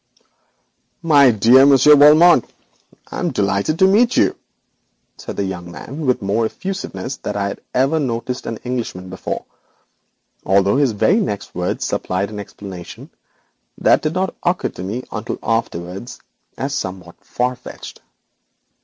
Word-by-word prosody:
'My 145 -5 +6
dear 120 +4 +6
Monsieur 140 +2 +7
Valmont, 150 -1 +7 0.7
I - - -5
am - - 0
delighted 100 +9 0
to 190 - +5
meet 235 +5 +3
you,' - - +3 0.8
began - - -7
the 100 - -1
young 90 -2 -5
man 140 - -7
with 125 -4 +1
more 110 +3 +1
of - - -11
effusiveness 190 -8 -5
than 105 - -5
I 100 -1 -1
had - - -8
ever 135 +5 +2
noticed 125 -2 -3
in 115 - -3
an - - -14
Englishman 115 -7 -5
before, 95 - -5 1.0
although 100 +4 +3
his 140 -5 +2
very 180 - +2
next 105 - -4
words 90 0 -2
supplied 95 +3 -2
an 105 - -6
explanation 95 -3 -10 0.7
that - - +3
did 155 0 -2
not 190 +1 -1
occur 175 +1 0
to - - -10
me 105 +7 -4
until - - -4
afterwards 105 -2 -3 0.4
as 135 +1 -3
somewhat 95 -8 -6
far 125 +1 -2
fetched. - - -11
120 Hz, 150 wpm, -19 LUFS, 100-145 Hz, 1.0 s, Monsieur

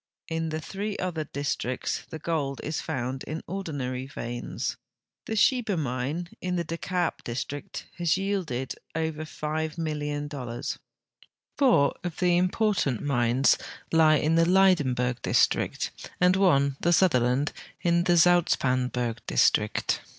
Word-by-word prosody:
In 165 0 -1
the 155 0 -3
three 200 +5 -4
other 170 -4 -2
districts 135 -3 -3
the 160 - -6
gold 150 -4 -2
is 155 +1 -2
found 130 +1 -3
in 155 +2 -5
ordinary 140 -9 -4
veins. 120 -3 -4 0.5
The 220 - -2
Sheba 225 -3 +3
mine, 145 +5 -2
in 180 0 -1
the 170 - 0
De 165 +1 -4
Kaap 180 -3 -1
district, 135 +4 -5
has 170 0 +2
yielded 185 -11 -2 0.2
over 160 -1 -2
85,000,000. 150 -5 -3 0.8
Four 245 - +4
of 175 -3 -4
the 180 -1 +3
important 180 - +1
mines 125 -1 +3 0.3
lie 160 -1 +6
in 155 +2 +2
the 165 0 +4
Lydenburg 135 -11 +3
district, - - +1 0.3
and 180 +1 +5
one, 140 -8 +3
the 175 - +2
Sutherland, 135 -5 +3 0.3
in 170 0 +3
the 175 -1 +4
Zoutpans 135 -7 +3
burg 120 -2 -2
district. - - +2
155 Hz, 130 wpm, -27 LUFS, 130-175 Hz, 0.8 s, lie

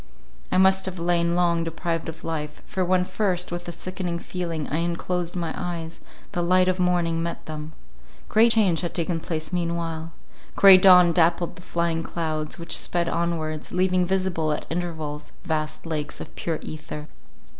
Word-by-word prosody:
I - - +2
must 190 0 +4
have 190 -1 -5
lain 170 0 +1
long 170 -1 +2
deprived 165 0 -3
of 160 - -9
life; 150 -2 -4
for 190 - -2
when 180 0 +2
first, 180 -4 -1
with 175 0 -5
a - - -3
sickening 175 0 -4
feeling, 170 -3 -4
I 150 - -1
unclosed 170 +1 -2
my 170 -3 -2
eyes, 170 -2 -5 0.3
the 175 - -1
light 185 +1 +4
of 185 0 +1
morning 175 -2 +1
met 170 0 -4
them. 155 0 -7 0.5
Great 225 +2 +6
change 195 -7 +3
had 175 - -4
taken 170 -1 -1
place 160 +1 -4
meanwhile: 170 -2 -2 0.4
grey 195 -1 +9
dawn 180 -2 +8
dappled 170 0 +2
the - - -12
flying 170 -2 -1
clouds, 155 -2 -3
which 170 - -4
sped 170 -1 0
onwards, 165 -2 -2
leaving 185 0 +2
visible 180 -4 0
at 150 - -2
intervals 160 -4 -4
vast 155 -3 -2
lakes 155 -3 -3
of - - -9
pure 165 -2 -2
ether. 155 -1 -7
170 Hz, 165 wpm, -24 LUFS, 165-180 Hz, 0.5 s, grey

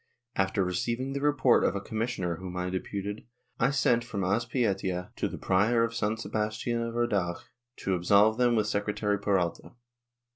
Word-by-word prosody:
After 95 0 +1
receiving 115 +9 -2
the 140 - -3
report 145 -4 +4
of - - +1
a - - 0
commissioner 100 -5 -2
whom 90 0 -7
I 90 0 -2
deputed, 100 +3 -4 0.3
I 125 - +4
sent 125 -4 +2
from 105 -5 -4
Azpeitia 100 -3 0
to - - -1
the - - -6
Prior 110 +5 +2
of 115 0 -1
San 110 -1 -1
Sebastian 110 +2 -2
of 115 0 -3
Urdax 100 -7 0 0.4
to 95 - 0
absolve 100 +5 +4
them 120 -1 +4
with 110 -2 +2
Secretary 105 0 -1
Peralta. 95 -4 -1
105 Hz, 160 wpm, -29 LUFS, 95-120 Hz, 0.4 s, report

